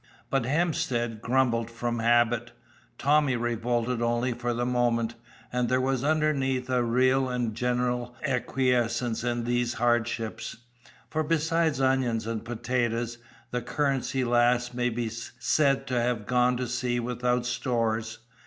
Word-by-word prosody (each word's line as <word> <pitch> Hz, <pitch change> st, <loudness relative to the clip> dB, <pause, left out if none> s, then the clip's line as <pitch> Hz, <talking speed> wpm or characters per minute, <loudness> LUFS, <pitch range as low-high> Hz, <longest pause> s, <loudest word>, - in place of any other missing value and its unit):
But 135 Hz, -4 st, +1 dB
Hemstead 130 Hz, -7 st, 0 dB
grumbled 120 Hz, -2 st, +1 dB
from 120 Hz, 0 st, -3 dB
habit, 120 Hz, 0 st, +2 dB, 0.4 s
Tommy 145 Hz, -2 st, +3 dB
revolted 120 Hz, 0 st, -1 dB
only 120 Hz, +1 st, +1 dB
for 120 Hz, +1 st, -2 dB
the 120 Hz, +1 st, -1 dB
moment, 120 Hz, -2 st, +1 dB, 0.4 s
and 125 Hz, -1 st, +1 dB
there 130 Hz, -, +3 dB
was 130 Hz, 0 st, 0 dB
underneath 140 Hz, -4 st, +1 dB
a 125 Hz, -1 st, +3 dB
real 130 Hz, +2 st, +2 dB
and 120 Hz, -3 st, -1 dB
general 125 Hz, +1 st, -1 dB
acquiescence 125 Hz, -3 st, 0 dB
in 120 Hz, -1 st, -1 dB
these 120 Hz, 0 st, 0 dB
hardships. 120 Hz, -1 st, -1 dB, 0.5 s
For 155 Hz, -, 0 dB
besides 165 Hz, -1 st, +1 dB
onions 130 Hz, -4 st, +1 dB
and 115 Hz, -1 st, -3 dB
potatoes, 120 Hz, 0 st, -2 dB, 0.3 s
the 125 Hz, -, -1 dB
Currency 135 Hz, +1 st, 0 dB
Lass 120 Hz, 0 st, +2 dB
may 125 Hz, 0 st, 0 dB
be 120 Hz, 0 st, -2 dB
said 125 Hz, +5 st, 0 dB
to 125 Hz, -2 st, 0 dB
have 120 Hz, -3 st, -1 dB
gone 125 Hz, +1 st, +2 dB
to 125 Hz, 0 st, -2 dB
sea 120 Hz, 0 st, -1 dB
without 125 Hz, 0 st, 0 dB
stores. 115 Hz, -3 st, -1 dB
120 Hz, 135 wpm, -27 LUFS, 120-130 Hz, 0.5 s, Tommy